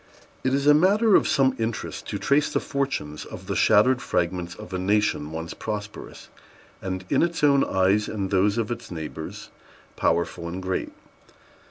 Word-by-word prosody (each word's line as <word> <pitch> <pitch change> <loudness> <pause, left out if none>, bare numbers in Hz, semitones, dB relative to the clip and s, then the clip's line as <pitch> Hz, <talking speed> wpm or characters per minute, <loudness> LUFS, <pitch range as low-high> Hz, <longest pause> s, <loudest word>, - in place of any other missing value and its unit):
It 130 +1 +2
is 140 0 -1
a 150 - +7
matter 200 +7 +4
of - - +4
some 135 -4 +3
interest 110 -1 -4
to - - -3
trace 145 +2 +2
the - - +1
fortunes 135 - -3
of - - -10
the - - -3
shattered 120 +4 +4
fragments 90 0 -2
of 105 -2 -10
a 95 - -1
nation 95 -6 +1
once 80 +1 -5
prosperous, 105 -1 -7 0.5
and, 95 0 -4
in - - +3
its 170 -2 0
own 140 -2 +5
eyes 95 +3 +2
and 100 -3 -3
those 100 +2 +2
of 115 -1 -1
its 120 0 -5
neighbors, 80 -2 -7 0.5
powerful 85 0 0
and 85 +2 -5
great. 95 0 -3
105 Hz, 170 wpm, -25 LUFS, 90-135 Hz, 0.5 s, a